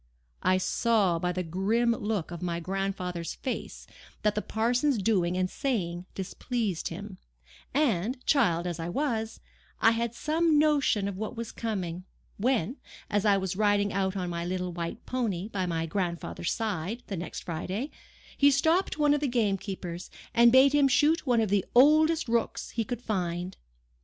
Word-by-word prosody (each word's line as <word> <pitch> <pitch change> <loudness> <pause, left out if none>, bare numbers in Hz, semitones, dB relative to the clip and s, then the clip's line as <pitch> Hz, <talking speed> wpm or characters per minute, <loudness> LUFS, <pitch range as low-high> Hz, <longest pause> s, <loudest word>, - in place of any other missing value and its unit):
I 185 0 +3
saw 195 -2 +2
by 180 +1 0
the 180 0 -2
grim 200 +8 +1
look 205 -7 -2
of 175 - -6
my 170 -1 -2
grandfather's 185 -1 -3
face 260 - -5 0.4
that 210 -1 +3
the 210 - -1
parson's 245 +6 +1
doing 185 -4 +1
and 185 0 +1
saying 185 -7 -2
displeased 200 0 -2
him; 190 +2 -7 0.5
and, 245 - +1
child 180 - +3
as 175 -2 -3
I 165 +1 -3
was, 225 -2 -2 0.4
I 225 - +6
had 230 0 -1
some 315 +2 +2
notion 285 -9 +3
of 200 -2 -4
what 215 +3 -5
was 230 -1 -4
coming, 185 -6 -4 0.3
when, 240 - 0 0.3
as 205 +1 +1
I 200 -2 +5
was 190 -1 -2
riding 205 0 +2
out 190 0 0
on 180 -2 -2
my 170 0 -3
little, 180 0 -3
white 170 +5 -5
pony, 215 -7 -2
by 190 -4 -2
my 165 -1 -1
grandfather's 170 -1 -2
side, 215 +1 -3
the 200 - -4
next 175 0 -6
Friday, 185 - -4 0.4
he 285 - +5
stopped 320 +7 +2
one 295 -1 +4
of 295 - 0
the 290 - +1
gamekeepers, 195 -7 -2 0.2
and 235 0 +6
bade 265 +2 +6
him 290 -1 +5
shoot 295 +4 +3
one 240 -2 +4
of 215 - 0
the 200 -2 +3
oldest 310 +4 +5
rooks 230 -1 -1
he 230 - -1
could 245 +3 -5
find. 180 -4 -2
205 Hz, 165 wpm, -28 LUFS, 180-245 Hz, 0.5 s, I